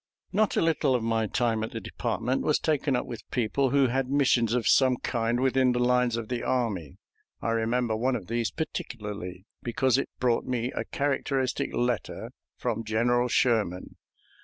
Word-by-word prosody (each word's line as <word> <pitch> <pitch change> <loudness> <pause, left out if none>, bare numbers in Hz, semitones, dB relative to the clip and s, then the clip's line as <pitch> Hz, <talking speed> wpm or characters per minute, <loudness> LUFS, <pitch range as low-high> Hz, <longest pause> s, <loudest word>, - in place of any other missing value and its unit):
Not 215 +2 +2
a - - +3
little 160 -5 +2
of 120 - 0
my 115 -1 +1
time 115 -1 0
at 110 - -5
the 115 - -3
department 125 +5 -2
was 150 - +2
taken 145 -3 0
up 125 - -1
with 120 -3 -7
people 130 +3 +1
who 140 +1 +4
had 130 +1 0
missions 130 -5 +3
of 125 - 0
some 130 -2 +5
kind 120 0 -1
within 130 -1 +3
the 125 - 0
lines 125 -1 +2
of 115 -2 -4
the 125 0 -2
army. 105 - -1 0.4
I - - -2
remember 115 0 0
one 125 +4 +1
of 105 -7 -5
these 115 +2 -1
particularly, 105 - -5 0.2
because 130 +1 +1
it - - -3
brought 120 -2 +1
me 125 0 -1
a - - -3
characteristic 140 -1 -1
letter 120 -4 -2 0.3
from 115 - -2
General 120 +3 +2
Sherman. 110 -7 +1
120 Hz, 175 wpm, -27 LUFS, 115-130 Hz, 0.4 s, some